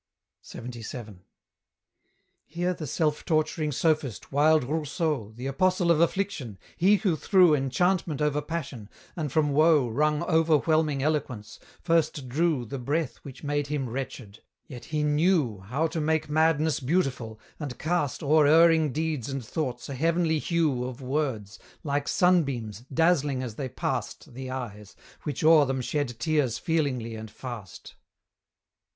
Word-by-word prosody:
LXXVII. 115 -4 -8 1.3
Here 175 +2 -1
the 155 -3 -6
self 150 +2 0
torturing 155 -1 0
sophist, 150 - -1
wild 150 +1 +4
Rousseau, 150 - -2
The 125 +3 -7
apostle 175 +5 +2
of 165 -1 +3
affliction, 170 - -1 0.2
he 195 +4 +4
who 195 -5 +1
threw 180 +1 +4
Enchantment 155 +3 0
over 150 -1 +1
passion, 140 -9 -6 0.3
and 155 -5 -3
from 150 0 +2
woe 150 -2 +4
Wrung 150 +6 +1
overwhelming 155 -2 +2
eloquence, 135 -8 -2 0.2
first 160 -5 +1
drew 150 -1 0
The 130 +4 -6
breath 140 0 -2
which 135 0 -12
made 145 0 -1
him 145 -3 -2
wretched; 120 -4 -6 0.2
yet 120 -3 -10
he 155 -1 -2
knew 150 - +2
How 125 +12 -2
to 160 - -3
make 155 0 0
madness 155 0 +2
beautiful, 130 -7 -1 0.2
and 145 -5 -5
cast 155 -4 -1
O'er 150 0 +4
erring 160 -1 +5
deeds 155 -4 -2
and 135 -3 -4
thoughts 125 -2 -4
a 140 - -5
heavenly 165 +3 +1
hue 155 -7 0
Of 130 +1 -6
words, 125 -7 -2 0.2
like 145 -1 -1
sunbeams, 135 - +1
dazzling 145 -4 +2
as 120 -4 -5
they 130 +3 -5
past - - -4
The 130 +1 -7
eyes, 105 -6 -7 0.3
which 150 -1 -3
o'er 155 -2 +7
them 135 0 -1
shed 125 -2 -2
tears 150 -7 +1
feelingly 140 -9 -1
and 110 0 -7
fast. 115 -6 -9
150 Hz, 140 wpm, -27 LUFS, 125-160 Hz, 1.3 s, o'er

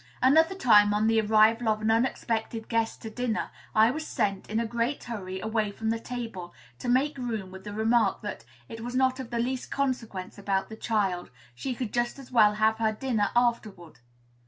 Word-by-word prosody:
Another 320 +8 +4
time, 210 - +5
on 210 +1 +2
the 225 0 +3
arrival 220 +2 +4
of 215 0 +1
an 215 +1 +1
unexpected 225 -1 -1
guest 230 -1 -1
to 220 - -6
dinner, 245 -1 -2 0.2
I 220 +2 +6
was 310 +3 -5
sent, 195 -2 -1
in 220 +1 0
a 230 - 0
great 235 +4 -2
hurry, 190 -5 -5
away 220 0 -1
from 220 +2 -2
the 225 - -1
table, 225 -8 -6 0.2
to 245 - -4
make 275 +3 +2
room, 220 -7 -4
with 190 +1 -11
the 205 - -5
remark 220 -1 +2
that 205 - -5 0.2
"it 225 - -8
was 245 +2 -5
not 260 0 +2
of 255 -3 -6
the 235 - -3
least 250 +2 -2
consequence 230 -10 -3
about 195 -1 -1
the 220 - -7
child; 200 -6 -1 0.2
she 250 - -4
could 240 -4 -4
just 240 +1 0
as 270 -2 -12
well 215 -4 +5
have 220 +1 +2
her 220 -1 +2
dinner 220 -2 0
afterward." 215 - -1
225 Hz, 200 wpm, -27 LUFS, 210-245 Hz, 0.2 s, I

